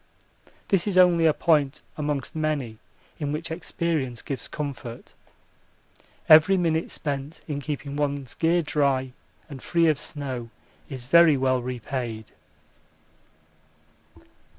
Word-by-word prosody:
This 195 -1 +2
is 195 -3 0
only 175 -3 +6
a - - +6
point 150 -3 +1
amongst 145 -3 -3
many 145 -8 -2 0.4
in 145 -2 -2
which 160 +2 -4
experience 160 -7 -2
gives 135 -4 -5
comfort. 135 -5 -7 1.1
Every 160 +5 +7
minute 165 -2 0
spent 145 +1 -4
in 145 -2 -3
keeping 145 -1 -5
one's 140 -3 -2
gear 170 +1 +2
dry 140 -3 0 0.4
and 140 -4 -9
free 170 -1 +2
of 155 - +1
snow 130 -5 -4 0.4
is 130 -4 -7
very 160 +1 +6
well 130 -1 +1
repaid. 120 -2 -4
145 Hz, 115 wpm, -25 LUFS, 130-160 Hz, 1.1 s, Every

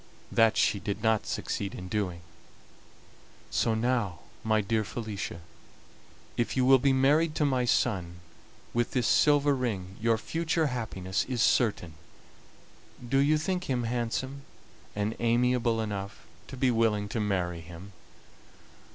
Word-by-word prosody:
That 115 -1 +4
she 100 - +2
did 100 +2 -4
not 110 -1 +2
succeed 100 -1 -3
in 90 - -7
doing; 90 -4 -2 1.3
so 115 - +1
now, 115 -6 0 0.3
my 110 -1 +2
dear 110 +2 0
Felicia, 105 -5 -5 1.0
if 120 +3 -1
you 130 - +3
will 135 0 +7
be 135 +2 +3
married 150 +4 +3
to 155 - +2
my 130 -3 +1
son 95 -8 0 0.6
with 120 0 0
this 125 -3 +1
silver 145 +1 +4
ring 100 -7 -3
your 115 0 +3
future 165 +6 -1
happiness 110 -8 -2
is 125 -3 0
certain. 100 -8 +2 1.1
Do 135 +3 +2
you 150 +2 +4
think 180 +3 -2
him 125 -3 -1
handsome 120 +4 -2 0.5
and 105 +2 -1
amiable 120 0 +2
enough 105 -1 -5 0.2
to 135 - -9
be 125 0 +2
willing 110 -3 +1
to 115 - -2
marry 90 -5 -1
him?" 85 +4 -11
115 Hz, 135 wpm, -28 LUFS, 100-130 Hz, 1.3 s, will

